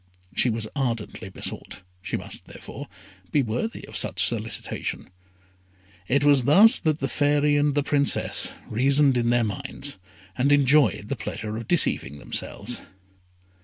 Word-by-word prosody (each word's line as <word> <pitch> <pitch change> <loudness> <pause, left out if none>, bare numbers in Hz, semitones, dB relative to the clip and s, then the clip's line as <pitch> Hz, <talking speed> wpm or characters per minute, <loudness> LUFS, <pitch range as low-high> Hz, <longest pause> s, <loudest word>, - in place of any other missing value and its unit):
She 125 - +3
was 110 -1 -2
ardently 115 -7 -3
besought 95 - -6 0.2
she - - -3
must, - - -8
therefore, - - -10 0.4
be 145 - +3
worthy 125 - -4
of - - -11
such - - +1
solicitation. - - -3 1.0
It 140 +2 +2
was 140 -4 +4
thus 210 - +7
that 155 -3 0
the 135 - -2
Fairy 145 +2 +2
and 145 -1 +2
the 145 - +2
Princess 140 0 +1 0.2
reasoned 135 +4 +3
in 120 -1 +1
their 120 0 +3
own - - +1 0.2
minds, 140 -3 -3 0.4
and 135 +3 +1
enjoyed 140 -6 +3
the 140 - -1
pleasure 105 -2 -5
of 115 +1 -6
deceiving 115 - +2
themselves. 105 +9 -4
135 Hz, 145 wpm, -24 LUFS, 115-145 Hz, 1.0 s, thus